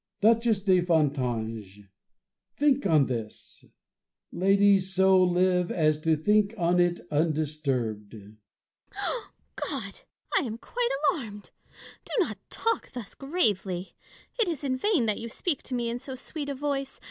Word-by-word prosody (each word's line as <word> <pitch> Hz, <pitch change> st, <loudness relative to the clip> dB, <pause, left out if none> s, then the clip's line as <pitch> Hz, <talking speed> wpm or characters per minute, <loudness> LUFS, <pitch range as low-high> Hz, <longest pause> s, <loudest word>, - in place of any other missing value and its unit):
Duchess 225 Hz, -1 st, +3 dB
de 185 Hz, -3 st, +4 dB
Fontanges! 120 Hz, -, -1 dB, 0.7 s
think 280 Hz, -4 st, +3 dB
on 155 Hz, -5 st, +4 dB
this! 115 Hz, -4 st, -6 dB, 0.7 s
Lady! 195 Hz, +1 st, +4 dB
so 190 Hz, 0 st, +3 dB
live 180 Hz, 0 st, +2 dB
as 155 Hz, -2 st, +1 dB
to 160 Hz, 0 st, +2 dB
think 210 Hz, +6 st, +2 dB
on 175 Hz, -1 st, +2 dB
it 175 Hz, 0 st, +2 dB
undisturbed! 145 Hz, -9 st, -1 dB
Fontanges. 105 Hz, 0 st, -13 dB, 1.2 s
God! 225 Hz, -9 st, -5 dB, 0.4 s
I -, -, +6 dB
am 230 Hz, -5 st, -4 dB
quite 480 Hz, -, -2 dB, 0.2 s
alarmed. 210 Hz, -7 st, -8 dB, 0.5 s
Do -, -, -8 dB
not 255 Hz, -, 0 dB
talk 455 Hz, 0 st, -1 dB
thus 245 Hz, -5 st, -7 dB
gravely. 205 Hz, -, -1 dB, 0.5 s
It 455 Hz, -, +3 dB
is 320 Hz, -5 st, -3 dB
in 265 Hz, -2 st, 0 dB
vain 315 Hz, -, +1 dB
that 215 Hz, -2 st, 0 dB
you 230 Hz, -, -6 dB
speak 305 Hz, +5 st, -2 dB
to 255 Hz, -, -3 dB
me 240 Hz, -1 st, -1 dB
in 235 Hz, +1 st, -3 dB
so 265 Hz, 0 st, -7 dB
sweet 285 Hz, +3 st, -6 dB
a 280 Hz, -, -3 dB
voice. 275 Hz, -1 st, -3 dB
195 Hz, 140 wpm, -27 LUFS, 155-250 Hz, 1.2 s, I